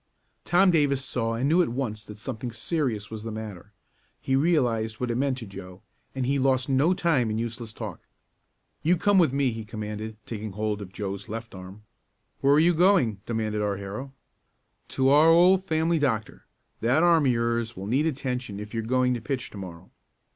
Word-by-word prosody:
Tom 180 +2 +4
Davis 140 -5 +2
saw 115 -2 -2
and 125 +4 0
knew 165 +4 +4
at 175 - +1
once 115 -4 -3
that 105 - -11
something 120 +2 -5
serious 115 - -2
was 110 -1 -6
the 115 +1 -5
matter. 105 -3 -8 0.5
He 135 - 0
realized 120 -8 +1
what 125 -1 -1
it - - -1
meant 135 +1 0
to 120 - -7
Joe, 95 -2 -11 0.3
and 130 -1 -1
he 140 +2 +1
lost 130 -1 +2
no 145 +7 +3
time 145 -11 +1
in 110 - -2
useless 115 0 -4
talk. 110 -6 -7 0.8
"You 175 +3 +3
come 205 +3 +3
with 165 -7 +4
me!" 135 -2 +1
he 115 0 -6
commanded, 105 0 -6
taking 110 -2 -6
hold 105 0 -2
of 95 -2 -8
Joe's 100 0 -5
left 115 +1 -6
arm. 95 +2 -10 0.6
"Where 140 +1 +4
are - - +5
you 170 +2 +4
going?" 165 - +3
demanded 110 -2 -1
our 100 -1 -1
hero. 105 +8 -6 0.8
"To 130 0 +1
our 150 +3 +6
old 180 +3 +5
family 165 -1 +1
doctor. 115 -7 -2 0.3
That 130 +8 +2
arm 165 -4 +4
of - - +4
yours 115 -1 -1
will 95 - -6
need 135 +9 +1
attention 125 -7 -3
if 105 0 -8
you're 115 - -1
going 125 +2 +1
to 120 - -4
pitch 130 +1 -4
to - - -10
morrow." 90 -1 -10
120 Hz, 195 wpm, -26 LUFS, 110-140 Hz, 0.8 s, our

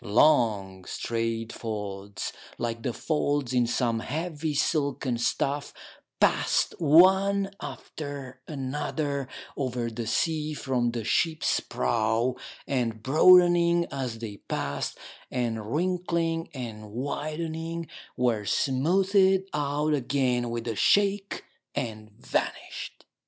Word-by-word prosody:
Long, 105 -6 +3
straight 115 -1 -2
folds, 100 -3 -5 0.2
like 115 -1 -3
the 125 - -1
folds 145 -2 -1
in 125 -2 +3
some 115 -1 +1
heavy 155 +2 -3
silken 140 -5 0
stuff, 140 +4 -1 0.4
passed - - +3
one 190 +5 +5
after 140 -4 -7
another 140 0 -2 0.3
over 125 -3 -2
the 115 0 -5
sea 155 +5 0
from 125 -4 0
the 115 -1 -3
ship's 160 +7 +1
prow, 110 - 0 0.3
and 115 -5 -1
broadening 175 +3 +6
as 130 -5 -3
they 110 -3 -6
passed, 70 -6 -3 0.3
and 115 -3 -2
wrinkling 170 -1 0
and 110 -5 -7
widening, 160 +6 -4 0.3
were 120 -4 +1
smoothed 190 - +3
out 150 +1 0
again 125 -3 +1
with 115 0 -4
a 115 - -1
shake, 200 - +2 0.3
and 110 -3 -4
vanished. - - -3
135 Hz, 105 wpm, -27 LUFS, 115-160 Hz, 0.4 s, broadening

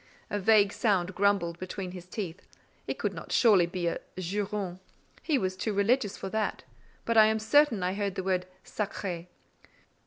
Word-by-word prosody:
A 205 - 0
vague 205 0 +4
sound 185 -5 +1
grumbled 190 -4 +1
between 185 0 -5
his 180 -1 -9
teeth; 185 -3 -5 0.5
it - - -3
could - - -2
not - - -8
surely 200 -8 +5
be 175 0 -3
a 170 - -1 0.2
"juron:" 195 0 -3 0.4
he 305 -4 +1
was 185 -5 -1
too 215 +3 -2
religious 205 +1 +1
for 195 - -5
that; 220 +1 -2 0.4
but 230 -1 +1
I 215 -1 +8
am 220 0 +2
certain 225 -1 +3
I 180 +1 0
heard 200 -1 -2
the 190 - -3
word 185 -1 0 0.2
sacré. 185 -4 -4
195 Hz, 175 wpm, -29 LUFS, 185-215 Hz, 0.5 s, I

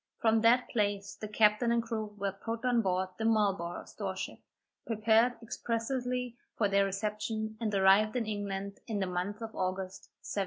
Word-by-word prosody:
From 225 -1 +3
that 240 +2 +5
place 205 -3 0
the 215 - -7
captain 210 +2 +3
and 235 0 +2
crew 220 -2 -4
were 200 0 -1
put 225 +5 -5
on 245 -2 +3
board 185 -2 0
the - - -1
Marlborough 195 -6 +1
store - - -5
ship, - - -5 0.5
prepared 225 +2 +3
expressly 245 +2 -2 0.2
for 210 - +3
their 200 0 +3
reception, 215 +2 -2
and 220 -2 0
arrived 195 +4 +5
in 240 -2 0
England 200 -2 -4
in 220 - -2
the 195 - 0
month 185 +5 -3
of 225 0 -6
August, 185 0 -3
1760. - - -4
215 Hz, 170 wpm, -31 LUFS, 195-230 Hz, 0.5 s, that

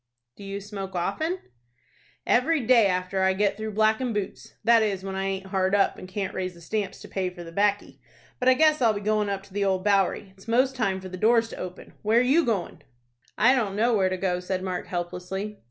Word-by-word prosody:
"Do - - -12
you 195 0 -5
smoke 195 -2 -7
often?" 310 - -1 0.9
"Every 285 +6 +3
day 235 -3 +5
after 185 +1 -1
I 190 0 +3
get 200 +1 +1
through 215 0 -5
blackin' 220 +3 +2
boots; 205 -2 -5
that 230 +1 +5
is, 200 -3 -1
when 195 0 -5
I 190 0 -2
aint 195 0 -3
hard 190 0 +1
up, 200 - +2
and 185 - -9
can't 195 0 -4
raise 185 -1 -3
the 170 - -15
stamps 200 +2 -3
to - - -10
pay 190 -2 -2
for 180 -1 -10
the 165 - -10
'baccy. 205 +3 0 0.4
But 255 - +3
I 255 - +6
guess 305 0 +4
I'll 230 -3 +4
be 205 - -4
goin' 210 0 +1
up 195 -1 -3
to 195 - -18
the 200 0 0
Old 190 -1 +1
Bowery. 195 -1 +1
It's 195 +3 -18
most 255 +3 +2
time 195 -6 -1
for 185 - -8
the 185 - -7
doors 230 +3 +3
to - - -9
open. 180 0 -8
Where 220 +3 +3
you 290 +7 +4
goin'?" 200 - -2 0.6
"I 255 - +5
don't 215 -7 0
know 230 +3 +2
where 190 -3 +3
to 185 - -2
go," 180 -1 0
said 185 +1 -3
Mark, 185 -1 -3
helplessly. 180 +4 -4
200 Hz, 230 wpm, -26 LUFS, 190-220 Hz, 0.9 s, I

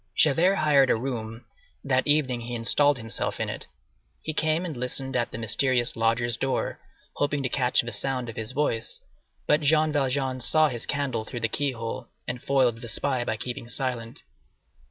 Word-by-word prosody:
Javert 165 +6 +4
hired 145 -6 +4
a - - +4
room; 115 -2 -5 0.4
that 130 -1 +1
evening 140 -5 +2
he 120 +1 -5
installed 145 +5 +3
himself 115 -1 -3
in - - -1
it. - - -6 0.6
He 155 - -3
came 155 +3 +1
and 160 -5 -5
listened 125 +2 -2
at 120 -1 +1
the - - -7
mysterious 120 +2 +2
lodger's 115 +1 +1
door, 135 -1 -2 0.4
hoping 145 -1 0
to 130 - -1
catch 125 -1 +2
the 120 - -6
sound 125 +3 -1
of 115 - -7
his 110 +1 -4
voice, 130 -5 -1 0.5
but 150 +2 +3
Jean 155 +1 +3
Valjean 135 -2 0
saw 155 +5 +5
his 120 -3 -4
candle 140 -6 -1
through 120 +2 -7
the 115 - +2
key 140 +4 -1
hole, 115 +1 -5 0.2
and 125 0 -4
foiled 125 -4 +1
the 120 - -7
spy 130 +1 0
by 110 -2 -2
keeping 120 0 -5
silent. 120 -3 -4
130 Hz, 180 wpm, -26 LUFS, 115-145 Hz, 0.6 s, saw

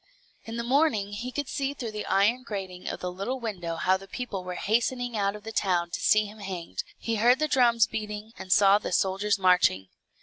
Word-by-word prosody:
In 225 +1 -6
the 235 - -2
morning 235 -6 +2
he 240 +5 -5
could 285 +1 -3
see 275 +1 -2
through 235 -5 -5
the 210 0 -5
iron 205 +6 +3
grating 190 -7 -6
of - - -6
the 180 - -3
little 200 +9 -4
window 180 -8 -4
how 185 +3 +2
the 195 +1 -13
people 225 -7 -5
were 180 0 -5
hastening 240 +4 0
out 200 -1 0
of 210 - -10
the 225 - -6
town 180 -5 0
to - - -3
see 215 0 +4
him 210 +1 -11
hanged; 180 - -5
he 230 -1 -2
heard 240 +4 +5
the 305 - 0
drums 235 -5 +4
beating, 210 0 -6
and 185 - -7
saw 200 +1 +6
the - - -5
soldiers 195 +3 +1
marching. 180 - +3
210 Hz, 215 wpm, -27 LUFS, 190-235 Hz, -, saw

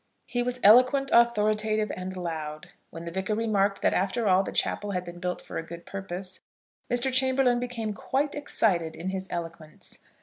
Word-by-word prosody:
He 245 - -2
was 250 +1 -2
eloquent, 255 +6 +6
authoritative 215 -2 +3
and 185 0 -6
loud. 155 -3 -5 0.2
When 165 0 -9
the 170 - -5
Vicar 190 +4 -2
remarked 205 -3 +1
that - - +3
after 205 +5 0
all 185 0 +5
the 195 - -4
chapel 205 -1 -1
had 180 -1 -2
been 175 0 -9
built 180 0 -3
for - - -5
a - - -5
good 170 +1 -10
purpose, 190 -1 -6 0.5
Mr. 245 +2 +2
Chamberlaine 260 -1 +3
became 235 -3 -3
quite 280 +7 -1
excited 185 - +1
in 180 +3 -4
his 190 0 -4
eloquence. 165 -2 -6
200 Hz, 175 wpm, -27 LUFS, 180-240 Hz, 0.5 s, eloquent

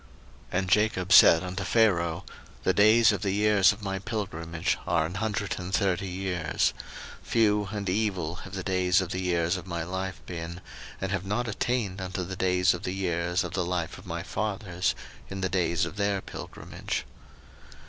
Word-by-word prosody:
01:047:009 90 - +1
And 95 -1 -3
Jacob 100 -3 +2
said 80 +1 +8
unto 90 +2 -4
Pharaoh, 90 -6 +2 0.4
The - - +3
days 110 +2 +6
of - - -2
the 100 - 0
years 105 -1 +5
of 105 +1 -8
my 95 -1 -2
pilgrimage 85 -6 -3
are 80 - +2
an 80 - -5
hundred 105 +1 -2
and 90 +1 -6
thirty 95 -1 +1
years: 90 -3 -1 0.5
few 105 -3 +2
and 100 -2 -4
evil 90 -4 -1
have 95 +1 -9
the 95 - -4
days 90 -1 +2
of 95 -3 -2
the 95 - -2
years 85 0 +1
of 90 +1 -9
my 85 -2 -3
life 95 +1 -4
been, 85 0 -6 0.4
and 95 0 -3
have 95 -1 -2
not 120 +4 -1
attained 110 -3 -1
unto 95 0 -3
the 95 +2 -5
days 90 -1 +3
of 90 - -5
the 90 - -3
years 90 -1 0
of 90 0 -6
the 90 - 0
life 85 -2 -3
of - - -14
my - - -4
fathers 100 -4 -2 0.3
in 95 0 -5
the 95 - 0
days 85 -1 +1
of - - -8
their 100 -1 +1
pilgrimage. - - -6
95 Hz, 185 wpm, -27 LUFS, 90-100 Hz, 0.5 s, said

